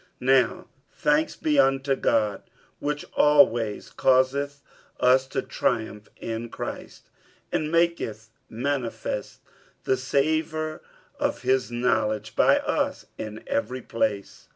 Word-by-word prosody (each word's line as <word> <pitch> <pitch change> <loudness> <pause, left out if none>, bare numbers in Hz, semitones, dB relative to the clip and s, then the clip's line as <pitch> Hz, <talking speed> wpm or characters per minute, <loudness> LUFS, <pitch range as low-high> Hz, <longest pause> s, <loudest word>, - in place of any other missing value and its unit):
47:002:014 130 +1 +5
Now 115 - -9 0.3
thanks 150 +1 +1
be 150 -2 +1
unto 135 0 +3
God, 105 -5 +1 0.4
which 145 0 -3
always 120 -8 +3
causeth 140 +2 +2 0.4
us 130 +1 +4
to 135 -1 -2
triumph 110 -3 -2
in 115 +1 -5
Christ, - - -7 0.4
and 155 0 -1
maketh 165 -11 0 0.2
manifest 125 0 -3 0.4
the 130 - +2
savour 155 +3 -1 0.4
of - - -1
his 130 -1 +2
knowledge 120 -3 0
by - - +5
us - - -1
in 110 0 -6
every 125 +2 -2
place. 105 -3 -3
130 Hz, 110 wpm, -25 LUFS, 115-145 Hz, 0.4 s, 47:002:014